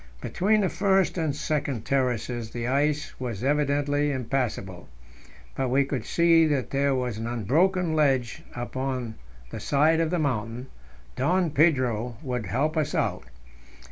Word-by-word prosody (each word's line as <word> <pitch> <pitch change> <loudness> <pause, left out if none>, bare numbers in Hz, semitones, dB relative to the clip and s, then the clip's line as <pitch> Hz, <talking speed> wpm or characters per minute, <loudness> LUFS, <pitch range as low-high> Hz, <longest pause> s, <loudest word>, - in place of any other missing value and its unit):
Between 210 - +1
the 190 - +1
first 195 -2 +2
and 160 -5 -1
second 140 -6 -2
terraces 125 -3 -1
the 120 0 -4
ice 145 +4 0
was 120 -4 -4
evidently 145 +1 +1
impassable. 120 -8 -3 0.6
But 130 -1 -1
we 135 +2 +3
could 135 -5 -3
see 165 -1 +4
that 140 -4 -1
there 140 0 +2
was 125 -4 -2
an 115 - -3
unbroken 160 - +1
ledge 135 -6 +1
up 120 +1 -6
on 130 -3 -2 0.4
the - - -5
side 155 +3 +3
of 165 -1 +1
the 180 - 0
mountain; 125 -4 -2 0.5
Don 170 +5 +1
Pedro 130 -7 +2
would 125 -6 -3
help 150 - 0
us 155 - 0
out. - - -1
135 Hz, 145 wpm, -26 LUFS, 120-155 Hz, 0.6 s, see